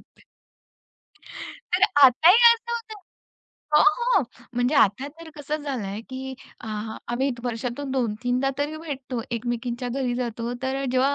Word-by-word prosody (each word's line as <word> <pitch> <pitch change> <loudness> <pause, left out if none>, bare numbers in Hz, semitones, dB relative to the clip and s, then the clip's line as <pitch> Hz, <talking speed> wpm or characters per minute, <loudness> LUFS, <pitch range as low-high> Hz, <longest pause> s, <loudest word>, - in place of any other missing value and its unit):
आवडते. - - -26 1.5
तर 360 +2 +1 0.2
आताही 315 - +7 0.2
असं 470 +1 -10
होतं 455 -2 -5 0.8
हो, 300 - +7 0.4
हो. - - +1 0.3
म्हणजे 245 +4 +1
आता 255 +2 +3
तर 330 - -10
कसं 295 +1 -3
झालंय, 215 -8 -4
की 265 0 -6 0.3
अ, - - -10 0.4
आम्ही 260 +3 0
वर्षातून 245 +3 -3
2 245 -5 0
तीनदा 250 +2 +1
तरी 295 +2 -2
भेटतो 270 -6 -5
एकमेकींच्या 240 +1 -3
घरी 250 0 -1
जातो, 235 -1 -3
तर 270 +1 -2
जेव्हा 265 +2 +3
260 Hz, 135 wpm, -24 LUFS, 240-285 Hz, 1.5 s, आताही